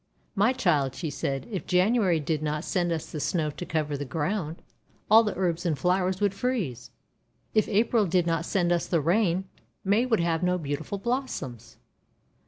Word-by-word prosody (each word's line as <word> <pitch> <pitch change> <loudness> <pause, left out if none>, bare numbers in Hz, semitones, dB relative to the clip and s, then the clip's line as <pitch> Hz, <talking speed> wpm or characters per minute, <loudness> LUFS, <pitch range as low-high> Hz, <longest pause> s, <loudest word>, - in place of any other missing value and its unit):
"My 205 +4 +3
child," 150 - +1
she 160 -4 -4
said, 135 0 -3
"if 190 - -4
January 185 -1 +3
did 155 0 -1
not 150 0 -2
send 175 -2 0
us 160 -2 -2
the 155 - -4
Snow 155 0 0
to 175 - -7
cover 150 -2 -1
the 145 - -3
ground, 160 - -3 0.5
all 220 +1 +9
the 225 - -2
little 190 -1 -3
herbs 170 -1 0
and 165 -5 0
flowers 185 +3 +1
would 205 -2 +1
freeze. 195 - -2 0.6
If 215 - +3
April 220 0 +2
did 175 0 +2
not 165 -1 0
send 175 -3 +1
us 175 -1 +1
the 170 - +2
Rain, 180 +3 +2 0.4
May 210 +5 +2
would 225 -4 +2
have 170 -1 +1
no 180 0 +2
beautiful 155 +4 -4
blossoms!' 200 - -4
175 Hz, 185 wpm, -27 LUFS, 155-200 Hz, 0.6 s, all